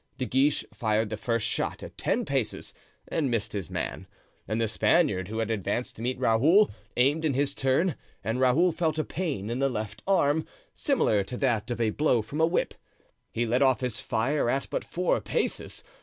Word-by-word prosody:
De 130 - -1
Guiche 135 +4 +2
fired 110 -1 0
the - - -1
first 115 +1 -1
shot - - -2
at - - -9
ten - - 0
paces - - -2 0.4
and 150 -5 0
missed 115 -3 -2
his 100 -6 -4
man; - - -4 0.4
and 110 - -1
the 115 - +2
Spaniard, 105 - +2
who 110 +2 -5
had 115 -1 -1
advanced 110 +3 -2
to - - -10
meet 125 +2 -1
Raoul, 135 - +4 0.3
aimed 140 +6 +3
in 150 -5 +1
his 140 +1 +1
turn, 140 +7 +1 0.3
and 115 +3 -1
Raoul 135 +8 +4
felt 160 -2 -1
a 155 - +1
pain 140 - -3
in 120 - -2
the 135 0 +2
left 105 -3 -5
arm, 160 -5 +2 0.3
similar 245 - +2
to 125 +5 -6
that 120 -4 0
of 120 - -3
a 110 -2 +2
blow 125 -4 +2
from 145 +8 -3
a 160 - +5
whip. 170 - 0 0.6
He 120 - 0
let 120 +3 +1
off 130 -3 +4
his 125 -4 -2
fire 125 +3 0
at 135 +2 -1
but - - -1
four 180 +1 0
paces. - - -2
125 Hz, 200 wpm, -27 LUFS, 110-150 Hz, 0.6 s, a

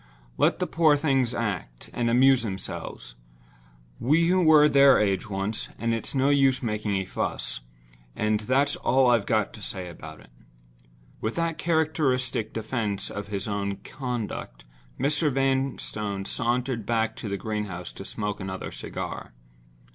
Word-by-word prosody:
let - - +3
the - - -1
poor 155 -3 +4
things 135 -5 +1
act, 95 - -4
and 120 -1 0
amuse 130 +2 +5
themselves. 95 - -6 0.9
We 165 +7 +3
were 160 -5 +6
their 140 -2 +6
age 100 +1 0
once—and 105 +3 -2
it's 115 +4 -4
no 135 +1 +3
use 135 -2 +3
making 105 -2 -1
a 95 0 -1
fuss—and - - -4
that's 135 +6 +2
all 130 0 +3
I've 115 -4 +2
got 110 -2 +1
to 110 - -11
say 95 -2 -5
about 80 -2 -10
it." - - -18 0.9
With 110 - -3
that 165 -1 -1
characteristic 145 -8 +1
defense 110 -3 -2
of 100 0 -5
his 100 +1 -4
own 100 -1 -2
conduct, 115 - -5 0.4
Mr. 145 +3 +2
Vanstone 130 -7 -1
sauntered 120 0 -1
back 115 -1 0
to 110 - -5
the 100 - -2
greenhouse 105 -5 -4
to - - -8
smoke 105 0 -3
another 95 -1 -5
cigar. - - -6
115 Hz, 140 wpm, -26 LUFS, 100-135 Hz, 0.9 s, were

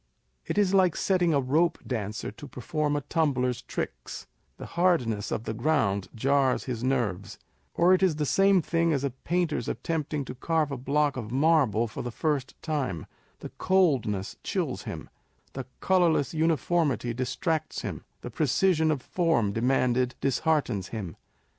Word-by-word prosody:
It - - -2
is 200 -2 +3
like 185 -4 +4
setting 180 -3 +2
a 145 - +3
rope 155 +6 +2
dancer 110 -5 -3
to 140 +7 -11
perform 145 +4 -2
a 145 - -1
tumbler's 130 -6 0
tricks - - -5
â€" 60 0 -38
the - - -8
hardness 160 - +1
of 110 - -2
the 110 - -3
ground 110 -8 +1
jars 135 +2 +2
his 120 -3 -4
nerves; 115 -8 -1 0.4
or 175 +2 +5
it 185 - +3
is 185 -5 +3
the 150 0 -1
same 195 +3 +4
thing 165 0 +1
as 140 -2 -1
a 140 - 0
painter's 170 +5 -1
attempting 150 -3 -2
to - - -6
carve 155 +3 0
a - - -2
block 140 +2 0
of 110 -3 -5
marble 135 -5 +3
for 110 - -6
the 120 - -4
first 140 +1 -2
time 135 - -2
â€" - - -11 0.4
the - - -6
coldness 135 - +1
chills - - -3
him, - - -6 0.5
the 130 -2 -6
colourless 175 -6 +2
uniformity 160 -5 +1
distracts 155 +7 -2
him, - - -5 0.2
the 125 - -7
precision 160 +5 +2
of 145 -5 -1
form 160 - +1
demanded 125 +1 +1
disheartens 135 - 0
him. 100 -7 -6
140 Hz, 160 wpm, -27 LUFS, 120-165 Hz, 0.5 s, or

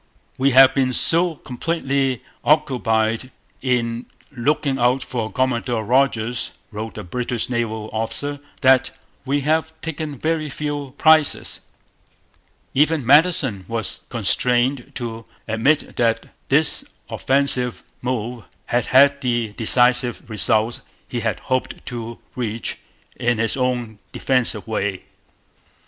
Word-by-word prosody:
'We 135 +1 +4
have 135 0 +9
been 130 -2 +1
so 170 +5 +3
completely 135 -2 -2 0.2
occupied 125 -6 +1 0.3
in 120 -2 -1 0.2
looking 140 +1 0
out 125 +2 +2
for 115 -4 -4
Commodore 120 -3 -1
Rodgers,' 120 -1 +1 0.2
wrote 110 -1 -6
a - - -5
British 120 +5 -3
naval 110 -3 -2
officer, 140 +6 -1 0.2
'that 130 0 +3 0.3
we 140 +1 +1
have 160 +2 -1
taken 155 -2 -5
very 155 +1 -1
few 145 -1 -5
prizes.' 155 -2 +4 1.1
Even 150 -1 +2
Madison 140 - +4
was 115 -3 -4
constrained 120 +3 +1
to 115 -1 -5 0.2
admit 115 +8 +1
that 115 -2 +1 0.2
this - - +3 0.2
offensive 130 -3 +1 0.2
move 120 -1 -3 0.2
had 120 -1 0
had 140 +2 +5
the 120 -4 -1
defensive 125 +1 +2
results 110 +1 +1 0.3
he 120 - -3
had 115 -1 -2
hoped 130 -1 -3
to 115 -1 -6 0.2
reach 115 -3 -3 0.4
in 120 -1 +1
his 115 0 0
own 125 -5 -2
'defensive' 125 -4 +1
way. 100 -4 -2
125 Hz, 115 wpm, -21 LUFS, 115-140 Hz, 1.1 s, have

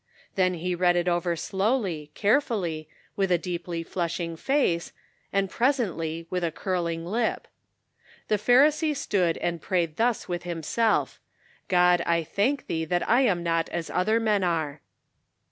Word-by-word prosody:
Then 185 -1 +2
he 180 +2 -2
read 175 0 +3
it 175 0 0
over 175 0 +1
slowly, 190 - -1
carefully, 200 - 0 0.3
with 195 -2 0
a 175 - +5
deeply 170 -1 -4
flushing 170 -1 -3
face, 175 - 0 0.4
and 195 0 +1
presently, 185 - -1
with 180 -1 -1
a 170 - +1
curling 170 -2 -2
lip: 225 +6 -1 0.4
" - - -30
The 210 - +2
Pharisee 295 - +4
stood 180 -8 +1
and 170 -2 -2
prayed 170 -4 -1
thus 235 -1 +1
with 175 -2 -3
himself: 175 +6 0 0.2
* - - -31
God, 180 -1 +4
I 170 -1 +2
thank 240 - 0
thee 160 -1 -2
that 175 +2 -1
I 245 +3 +4
am 190 -9 +2
not 165 -1 0
as 170 -1 -4
other 215 +5 +2
men 210 -3 +1
are.' 160 -4 -1
180 Hz, 155 wpm, -26 LUFS, 170-210 Hz, 0.4 s, a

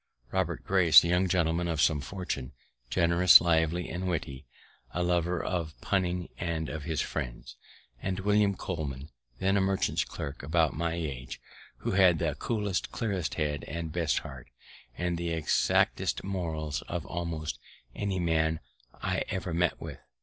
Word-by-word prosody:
Robert 90 -3 -1
Grace, 95 -4 +7
a 85 - -1
young 90 +2 +3
gentleman 85 -1 +1
of 80 -3 -1
some 75 0 +3
fortune, 70 -5 -5 0.4
generous, 85 +2 +7
lively, 85 0 +1
and 90 +2 -4
witty; 70 -6 -3 0.5
a 90 - +1
lover 85 0 +1
of 85 -4 -3
punning 90 -2 0
and 80 -2 -2
of 75 -1 -5
his 80 -3 -1
friends. - - -5 0.5
And 95 0 -2
William 105 0 +3
Coleman, 75 -6 -5 0.3
then 95 +5 +2
a - - +3
merchant's 95 0 +1
clerk, 70 0 -6
about 80 +2 +2
my 85 +1 -1
age, 70 -7 -5 0.4
who - - -1
had 95 -3 +5
the 80 -2 0
coolest, 105 -3 -2
clearest 100 -8 -2
head, 75 -2 -1
the 85 0 -3
best 80 -2 0
heart, 65 -3 -6 0.5
and 90 -1 -1
the 85 0 -2
exactest 80 -2 +1
morals 80 -5 -3
of 85 -2 -3
almost 80 -3 -4 0.3
any 100 -2 -2
man 80 -2 +1 0.4
I - - 0
ever 90 -2 -3
met 85 +1 +1
with. - - -7
85 Hz, 150 wpm, -29 LUFS, 80-90 Hz, 0.5 s, Grace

